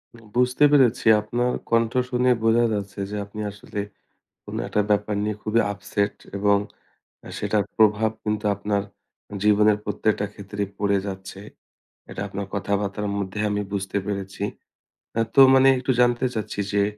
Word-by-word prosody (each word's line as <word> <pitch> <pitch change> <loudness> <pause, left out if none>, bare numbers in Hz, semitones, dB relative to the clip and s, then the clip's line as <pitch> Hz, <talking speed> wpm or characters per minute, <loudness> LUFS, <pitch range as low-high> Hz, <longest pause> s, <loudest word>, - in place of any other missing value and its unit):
উম 115 - -16
বুঝতে 125 +3 +2
পেরেছি, 130 -5 +4 0.2
আপনার 120 +3 -1 0.2
কণ্ঠ 115 -1 +2 0.2
শুনেই 125 0 +3
বোঝা 115 +1 +4
যাচ্ছে 100 -1 -4
যে - - -4
আপনি 105 +1 -8
আসলে 105 +1 -8 0.7
কোনো - - -6
১ - - -11
টা 105 - +5
ব্যাপার 105 0 +1
নিয়ে 105 0 -2
খুবই 110 +2 +2
upset 100 0 -2 0.2
এবং 100 0 +3 0.8
সেটার 105 -2 0
প্রভাব 110 0 +4
কিন্তু 105 0 -2
আপনার 100 0 -1 0.6
জীবনের 105 0 +4
প্রত্যেকটা 105 0 0
ক্ষেত্রেই 100 0 -5
পড়ে 100 -1 +2
যাচ্ছে। 95 0 -7 0.7
এটা - - -6
আপনার 100 0 -5
কথাবার্তা-র 100 0 -2
মধ্যে 100 +1 -4
আমি 105 0 -1
বুঝতে 95 -1 -3
পেরেছি। 100 -1 -4 0.8
আ - - +4
তো 135 - +8
মানে 135 0 +6
একটু 125 +1 -1
জানতে 120 +1 +2
চাচ্ছি 105 -1 -4
যে, 100 - +3
105 Hz, 150 wpm, -24 LUFS, 100-115 Hz, 0.8 s, তো